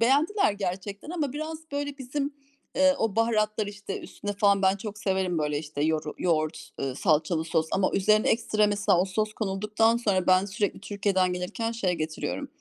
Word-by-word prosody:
Beğendiler 290 - +3
gerçekten 200 - -4
ama 300 -7 -2
biraz 310 +2 -4
böyle 285 0 -3
bizim, 280 +2 -3 0.4
ııı, 280 0 +6
o 225 -2 -1
baharatlar 215 -2 +1
işte 205 -1 -6
üstüne 205 0 -6
falan 200 -1 +3
ben 190 +1 +4
çok 210 +1 -7
severim 190 -4 0
böyle 150 -1 0
işte 150 -1 -4
yoru 155 -1 0
yoğurt, 155 -3 -1 0.2
salçalı 160 0 +2
sos 160 -1 0
ama 190 -1 +2
üzerine 215 +2 +3
ekstra 215 -2 +2
mesela 205 -4 +2
o 185 - +3
sos 215 +3 -1
konulduktan 215 +3 +1
sonra; 200 -6 +1
ben 185 +1 +5
sürekli 205 0 -2
Türkiye'den 195 -3 0
gelirken 180 +6 -3
şey 195 -6 0
getiriyorum 155 - -3
205 Hz, 165 wpm, -27 LUFS, 185-225 Hz, 0.4 s, ııı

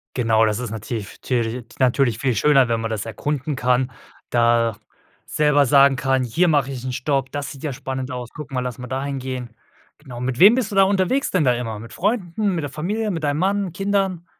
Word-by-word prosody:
Genau, 115 -3 +3
das 105 +1 0
ist 125 -4 -4
nativ 110 -1 -6
türlich 120 -1 -1
natürlich 125 -3 +2
viel 130 -4 0
schöner, 135 +2 +4
wenn 115 -1 0
man 115 0 -3
das 110 -1 -3
erkunden 145 +5 -3
kann, 125 +1 +1 0.4
da 115 -2 +2 0.5
selber 150 -1 +3
sagen 140 +1 +5
kann: 130 0 +1
„Hier 170 +10 +1
mach 145 -5 +2
ich 130 -2 -6
'n 130 - -2
Stopp, 135 +1 -1
das 145 -1 -4
sieht 135 - -11
ja 145 -4 -2
spannend 130 +1 -5
aus. 125 -2 -5
Guck 150 -1 -9
mal, 130 - -1
lass 125 -2 -4
mal 125 - -7
dahin 135 +2 -3
gehen.“ 130 -2 -5 0.5
Genau, 125 -5 -10
mit 125 0 -2
wem 200 +7 +8
bist 240 -4 -1
du - - -4
da 195 - +6
unterwegs 200 +8 +1
denn 180 -5 +2
da 125 - +3
immer? 115 -3 -4
Mit 115 - -11
Freunden, 200 -1 -1
mit 165 - -1
der 145 - -3
Familie, 205 +9 -2
mit 165 -5 -3
deinem 145 +1 0
Mann, 195 0 0
Kindern? 195 -2 -1
135 Hz, 215 wpm, -21 LUFS, 125-160 Hz, 0.5 s, wem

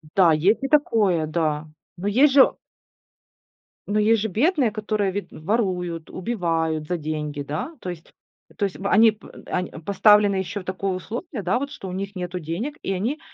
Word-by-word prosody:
Да, 180 -4 +6
есть 185 - +2
и - - +1
такое, 210 - +2
да, 155 -1 -1 0.3
но 185 +4 -4
есть 265 +8 +5
же 270 -2 +6 1.3
но 210 +1 +1
есть 220 0 +3
же 220 - 0
бедные, 265 - +2
которые, 210 -2 -1
вед 205 +1 -4
воруют, 180 -3 -2
убивают 165 -7 -2
за 180 - -1
деньги, 150 -2 -4
да? 160 - -5
То 185 - -5
есть 175 -2 -9 0.5
то 205 - +1
есть 195 - -4
в 195 - -3
они 220 +2 +6
п 215 - -15 0.2
они 180 0 -2
поставлены 200 +4 +4
еще 190 +2 -3
в - - -13
такое 190 +1 -2
условие, 235 - -5
да, 185 +5 +1
вот, 280 +1 -4
что 190 - -8
у - - -5
них 195 +2 -5
нету 180 0 -4
денег. 180 - -4
И 195 - -1
они, 230 +11 -2
195 Hz, 185 wpm, -23 LUFS, 170-220 Hz, 1.3 s, Да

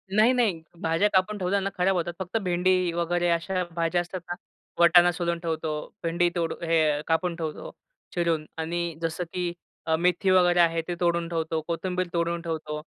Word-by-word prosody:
नाही-नाही, 220 -6 +3 0.2
भाज्या 165 +5 +2
कापून 190 +3 +2
ठेवल्या 190 +1 0
ना 195 - -2
खराब 185 +1 +2
होतात. 175 0 -1
फक्त 190 +4 -2
भेंडी 180 0 +2
वगैरे 175 +1 0
अशा 180 +2 0
भाज्या 170 +1 +1
असतात 180 +2 -6
ना, 175 - -2 0.5
वटाणा 175 +1 +7
सोलून 170 -1 -2
ठेवतो. 160 -2 -2 0.3
भेंडी 170 +1 +2
तोडून 165 0 -2
हे 155 -3 +3
कापून 165 +1 +1
ठेवतो 160 -2 -5 0.4
चिरून 165 -3 0
आणि 170 0 -2
जसं 165 +2 -2
की 180 -1 -1 0.5
मेथी 180 +2 +2
वगैरे 175 -1 +4
आहे 165 -1 +4
ते 175 - -2
तोडून 170 -1 +1
ठेवतो. 160 -1 -1
कोथिंबीर 180 +1 -2
तोडून 170 0 0
ठेवतो. 155 -2 -4
170 Hz, 160 wpm, -26 LUFS, 165-180 Hz, 0.5 s, वटाणा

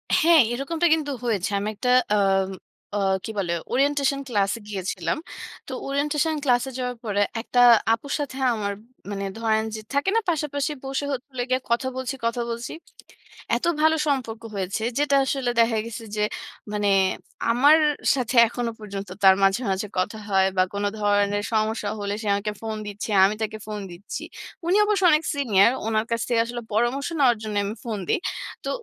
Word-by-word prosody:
হ্যাঁ, 330 -2 +6
এরকমটা 320 +7 0
কিন্তু 300 -3 -1
হয়েছে। 215 -4 0
আমি 205 - -3
একটা 250 +4 -2 0.3
আ - - +3 0.8
আ - - +1 0.3
কি 220 - -4
বলে 175 -3 -1 0.2
ওরিয়েন্টেশন 280 +1 +2
ক্লাসে 205 -1 0
গিয়েছিলাম। 190 - -2 0.5
তো - - -7 0.2
ওরিয়েন্টেশন 295 +3 0
ক্লাসে 250 0 +2
যাওয়ার 250 -1 -3
পরে, 205 -2 0 0.2
১ 225 - -8
টা - - +6 0.3
আপুর 280 +5 -4
সাথে 275 -2 -4 0.2
আমার 200 -2 -2 0.4
মানে 200 0 -3
ধরেন 220 -1 +1
যে, - - -5
থাকে 285 +7 +1
না, - - +5
পাশাপাশি 295 -2 -1
বসে 270 +1 -2
হচ্ছে 265 +1 -4
হল 250 - -7
গিয়ে, 255 0 +2
কথা 250 +3 +1
বলছি, 260 +1 -3
কথা 235 +1 0
বলছি। 235 0 -4 0.8
এত - - -4 0.2
ভালো 315 +1 +5
সম্পর্ক 235 -5 -1
হয়েছে, 195 +3 -2 0.2
যেটা 290 -1 +2
আসলে 265 -2 -1
দেখা 230 -1 +2
গেছে 230 0 -7
যে, 210 - +1 0.5
মানে 205 -1 0 0.6
আমার 285 +6 +6 0.4
সাথে 250 -1 -2
এখনো 235 0 -3
পর্যন্ত 200 -2 -7
তার 190 0 +8
মাঝে, 195 +5 +3
মাঝে 195 +2 -2
কথা 210 +4 -1
হয় 190 -1 +4
বা 185 - +6
কোন 200 0 -2 0.2
ধরনের 205 0 +2
সমস্যা 215 -1 0
হলে, 200 0 -2
সে 215 - -5
আমাকে 210 +1 -2
ফোন 220 -1 -3
দিচ্ছে। 205 +1 -5
আমি 210 +2 +1
তাকে 215 0 -3
ফোন 210 -1 -4
দিচ্ছি। 175 +4 -7 0.4
উনি 370 +4 +4
অবশ্য 415 -2 +1
অনেক 305 +1 +3
সিনিয়র। 230 -6 +4 0.2
উনার 220 0 +1
কাছ 230 -1 0
থেকে 235 -1 +2
আসলে 240 0 -5
পরামর্শ 240 +5 +1
নেওয়ার 245 -4 +4
জন্য 215 -1 -4
আমি 210 +3 -4
ফোন 220 -4 -3
দেই। - - +2 0.5
তো - - -2
230 Hz, 175 wpm, -24 LUFS, 205-275 Hz, 0.8 s, তার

